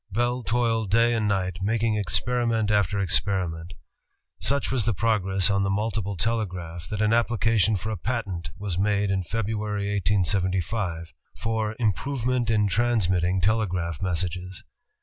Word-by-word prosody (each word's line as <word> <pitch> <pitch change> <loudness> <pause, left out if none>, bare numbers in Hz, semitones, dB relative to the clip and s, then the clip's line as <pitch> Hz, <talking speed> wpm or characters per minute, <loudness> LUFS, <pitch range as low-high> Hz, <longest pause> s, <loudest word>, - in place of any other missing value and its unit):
Bell 120 +4 0
toiled 115 -2 0
day 115 +3 +4
and 110 -2 +1
night, 95 -4 0
making 110 +2 +1
experiment 110 +3 0
after 100 -1 +2
experiment. 90 -2 -1 0.6
Such 140 +1 0
was 130 -4 +1
the 115 -3 +1
progress 95 -4 +1
on 100 0 +2
the 100 - +1
multiple 100 -1 -1
telegraph, 90 -7 -2
that 105 0 -1
an 105 - +2
appli 120 -1 +2
cation 110 -1 +3
for 105 +4 -3
a 110 - -3
patent 95 -6 -3
was 100 -4 -3
made 100 0 +1
in 95 -1 +1
February, 105 0 -2
1875, 95 -1 0 0.3
f^^ 110 -1 -1
"Im 110 -4 +2
provement 125 0 -1
in 105 -2 +3
Transmitting 95 -5 +1
Telegraph 90 -6 0
Messages." 90 0 -3
105 Hz, 145 wpm, -25 LUFS, 95-115 Hz, 0.6 s, day